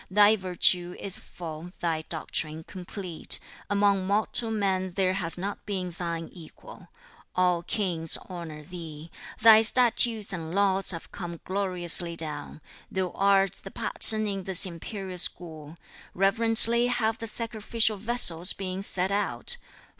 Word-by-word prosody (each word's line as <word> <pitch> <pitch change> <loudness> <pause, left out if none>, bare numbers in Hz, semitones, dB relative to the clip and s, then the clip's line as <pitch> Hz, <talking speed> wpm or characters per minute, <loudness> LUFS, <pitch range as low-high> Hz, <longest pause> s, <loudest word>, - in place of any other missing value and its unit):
Thy 205 +3 +5
virtue 180 -2 +1
is 195 -2 0
full, 165 +1 -10
thy 165 -2 -2
doctrine 160 -1 -3
complete. 180 -1 -2 0.3
Among 200 -2 +1
mortal 215 +3 0
men 190 -4 -2
there 185 -1 0
has 180 -3 -1
not 195 +3 -6
been 185 -3 -4
thine 170 -1 -5
equal. 165 -3 -14 0.5
All 180 -1 +1
kings 170 -4 +1
honor 165 -4 -9
thee. 165 -2 -10 0.3
Thy 220 -1 +8
statutes 225 -2 +3
and 165 -1 -6
laws 195 -1 +2
have 165 -3 -2
come 170 -3 -7
gloriously 180 -3 +2
down. 155 -1 -4 0.3
Thou 185 -2 -3
art 195 -1 +1
the 195 - -8
pattern 215 +2 +2
in 195 -3 -4
this 190 +1 +2
imperial 185 +1 -7
school. 160 -3 -1 0.4
Reverently 225 +4 +3
have 225 -2 -1
the 230 - -4
sacrificial 225 -1 0
vessels 190 -6 +3
been 190 -1 -6
set 190 -1 +5
out. 205 - -1
185 Hz, 130 wpm, -26 LUFS, 170-205 Hz, 0.5 s, Thy